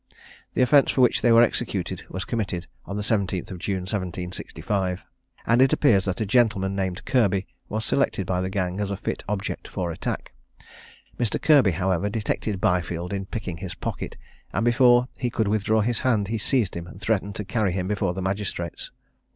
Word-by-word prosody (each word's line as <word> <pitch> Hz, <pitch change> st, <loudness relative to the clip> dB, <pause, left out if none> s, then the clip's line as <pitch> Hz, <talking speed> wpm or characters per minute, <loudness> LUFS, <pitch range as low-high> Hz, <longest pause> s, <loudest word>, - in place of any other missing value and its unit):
The -, -, +4 dB
offence 140 Hz, +3 st, +5 dB
for 130 Hz, -, +2 dB
which 125 Hz, -, +4 dB
they 120 Hz, -, +4 dB
were 115 Hz, +1 st, +8 dB
executed, -, -, -1 dB
was 95 Hz, -, -4 dB
committed 100 Hz, -7 st, -2 dB, 0.2 s
on 100 Hz, -, -4 dB
the 105 Hz, -, -2 dB
17th 100 Hz, -2 st, -1 dB
June, 95 Hz, 0 st, -2 dB
1765; 90 Hz, 0 st, -3 dB, 0.4 s
and 120 Hz, +2 st, +4 dB
it 130 Hz, -, +5 dB
appears 100 Hz, -10 st, +4 dB
that 95 Hz, -3 st, -2 dB
a 110 Hz, -, 0 dB
gentleman 100 Hz, -4 st, +2 dB
named 95 Hz, -2 st, -2 dB
Kirby 100 Hz, -6 st, +2 dB, 0.2 s
was 110 Hz, +1 st, -2 dB
selected 135 Hz, -8 st, +1 dB
by 90 Hz, 0 st, 0 dB
the 95 Hz, -, -2 dB
gang 95 Hz, -1 st, -2 dB
as 100 Hz, -1 st, -1 dB
a 100 Hz, -, -2 dB
fit -, -, -4 dB
object 105 Hz, -1 st, -3 dB
for 90 Hz, -3 st, -3 dB
attack. 80 Hz, -, -4 dB, 0.9 s
Mr. 120 Hz, -4 st, 0 dB
Kirby, 145 Hz, -9 st, +5 dB
however, 95 Hz, +2 st, 0 dB
detected 105 Hz, -2 st, -2 dB
Byfield 90 Hz, 0 st, 0 dB
in 95 Hz, -1 st, -3 dB
picking 95 Hz, -6 st, -4 dB
his 90 Hz, +1 st, -6 dB
pocket, -, -, -5 dB, 0.3 s
and 115 Hz, -, 0 dB
before 120 Hz, +1 st, +5 dB
he 125 Hz, -, 0 dB
could 110 Hz, -2 st, 0 dB
withdraw 110 Hz, +1 st, +2 dB
his 115 Hz, +2 st, 0 dB
hand, 110 Hz, -6 st, +1 dB
he 115 Hz, 0 st, -1 dB
seized 115 Hz, -3 st, +1 dB
him 85 Hz, 0 st, -5 dB
and 95 Hz, -, -11 dB
threatened 100 Hz, -1 st, -1 dB
to 105 Hz, -, -4 dB
carry 105 Hz, -1 st, 0 dB
him 90 Hz, 0 st, -2 dB
before 100 Hz, -3 st, 0 dB
the 95 Hz, -, -3 dB
magistrates. 95 Hz, -3 st, -3 dB
100 Hz, 185 wpm, -25 LUFS, 95-115 Hz, 0.9 s, were